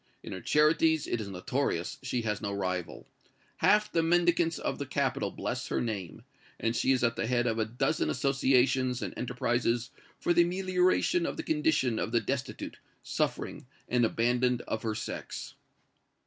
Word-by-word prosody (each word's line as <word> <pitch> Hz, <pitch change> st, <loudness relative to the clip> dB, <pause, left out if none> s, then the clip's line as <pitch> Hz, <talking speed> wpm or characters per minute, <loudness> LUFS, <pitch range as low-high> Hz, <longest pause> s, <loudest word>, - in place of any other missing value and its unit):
In -, -, -8 dB
her 95 Hz, -, -5 dB
charities, 155 Hz, -, +3 dB
it 120 Hz, -, -2 dB
is 105 Hz, -, -5 dB
notorious, 95 Hz, -2 st, -2 dB
she 120 Hz, -2 st, -2 dB
has 105 Hz, -2 st, -2 dB
no 100 Hz, -2 st, -2 dB
rival. 90 Hz, -3 st, -3 dB, 0.5 s
Half 210 Hz, 0 st, +3 dB
the 165 Hz, -, +2 dB
mendicants 170 Hz, 0 st, +2 dB
of -, -, -3 dB
the 140 Hz, -, -4 dB
capital 140 Hz, 0 st, 0 dB
bless 125 Hz, 0 st, -4 dB
her -, -, -1 dB
name, 100 Hz, -8 st, -4 dB, 0.4 s
and 115 Hz, +1 st, 0 dB
she 130 Hz, -, +2 dB
is 130 Hz, -2 st, +2 dB
at 115 Hz, 0 st, +2 dB
the -, -, -2 dB
head 120 Hz, 0 st, +1 dB
of 115 Hz, -1 st, 0 dB
a 110 Hz, -, +2 dB
dozen 120 Hz, +7 st, 0 dB
associations 130 Hz, -1 st, +2 dB
and -, -, -4 dB
enterprises 120 Hz, 0 st, -1 dB, 0.3 s
for 175 Hz, -, +2 dB
the 175 Hz, -, +5 dB
amelioration 180 Hz, -1 st, +2 dB
of -, -, -4 dB
the -, -, -3 dB
condition 150 Hz, -6 st, +1 dB
of -, -, -2 dB
the 120 Hz, -, +5 dB
destitute, 130 Hz, +2 st, -4 dB, 0.2 s
suffering -, -, -2 dB, 0.2 s
and 125 Hz, -1 st, +2 dB
abandoned 120 Hz, +2 st, +1 dB
of 110 Hz, -, -3 dB
her 110 Hz, -1 st, -2 dB
sex." 115 Hz, -, -6 dB
125 Hz, 170 wpm, -30 LUFS, 115-155 Hz, 0.5 s, the